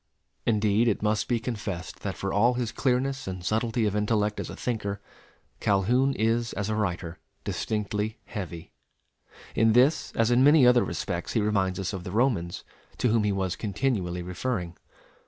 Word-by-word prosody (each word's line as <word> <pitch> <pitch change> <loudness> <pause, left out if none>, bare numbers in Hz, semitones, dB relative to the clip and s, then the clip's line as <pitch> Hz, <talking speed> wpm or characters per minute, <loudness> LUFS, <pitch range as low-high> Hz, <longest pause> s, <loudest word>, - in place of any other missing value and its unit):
Indeed, 110 +1 +3
it 105 -2 0
must 105 0 +1
be 120 -2 +1
confessed 105 -7 -5
that 95 -2 -4
for 95 - -3
all 120 +5 +4
his 120 -3 -2
clearness 130 0 0
and 90 -1 -5
subtlety 115 +2 +1
of 105 -1 0
intellect 105 0 +1
as - - -4
a - - -7
thinker, 105 -5 -3 0.6
Calhoun 120 +8 +2
is 115 +1 +1
as 100 0 -2
a 110 - 0
writer 90 -5 -2 0.2
distinctly 105 +1 -2
heavy. 85 -5 -7 0.8
In 110 0 +4
this 130 +7 +3
as 115 +1 +2
in 125 +2 +5
many 145 -1 +7
other 125 0 +6
respects 85 +1 -3
he - - +2
reminds 95 -3 +1
us 95 +1 -2
of 95 -2 -5
the - - -6
Romans, 105 -7 0 0.3
to 125 - +2
whom 110 -1 +3
he 105 - +2
was 95 -2 -1
continually 100 -6 -1
referring. 90 -1 -3
105 Hz, 170 wpm, -27 LUFS, 95-120 Hz, 0.8 s, many